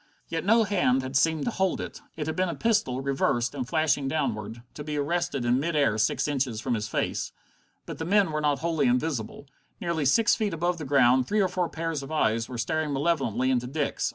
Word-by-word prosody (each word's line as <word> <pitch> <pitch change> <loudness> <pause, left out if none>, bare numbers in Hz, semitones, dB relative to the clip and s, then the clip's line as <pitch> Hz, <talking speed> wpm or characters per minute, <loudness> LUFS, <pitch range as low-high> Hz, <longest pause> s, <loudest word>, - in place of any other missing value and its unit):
Yet 165 -1 -3
no 225 +4 +4
hand 175 -11 +1
had 130 +1 -6
seemed 160 +3 +2
to 240 - 0
hold 190 -3 0
it. - - -7
It 155 - -3
had 160 - -3
been 185 -1 0
a 170 - -3
pistol, 205 - +1
reversed, 135 -3 0
and 130 -4 -4
flashing 150 -2 +1
downward, 120 -6 -3
to 145 - -7
be 150 0 -4
arrested 150 -2 -1
in 120 +2 +3
mid 165 +3 -2
air 140 -7 +2
six 110 - +1
inches 130 -6 -1
from 125 +2 -2
his 105 -2 -2
face. - - -2 0.5
But - - -7
the 160 - -3
men 195 -1 +3
were 155 0 -1
not 145 -2 +2
wholly 160 -5 +1
invisible. 125 0 -1 0.3
Nearly 170 -4 -1
six 225 - +4
feet 210 -6 -1
above 175 +1 -1
the 155 - -5
ground, 130 -2 +4
three 215 - +1
or 195 - +3
four 180 -2 -1
pairs 165 -2 -3
of 135 - -9
eyes 115 -7 +1
were 125 - -6
staring 155 +6 -1
malevolently 135 -4 +1
into 125 -1 0
Dick's. 145 +2 -1
145 Hz, 220 wpm, -27 LUFS, 130-170 Hz, 0.5 s, no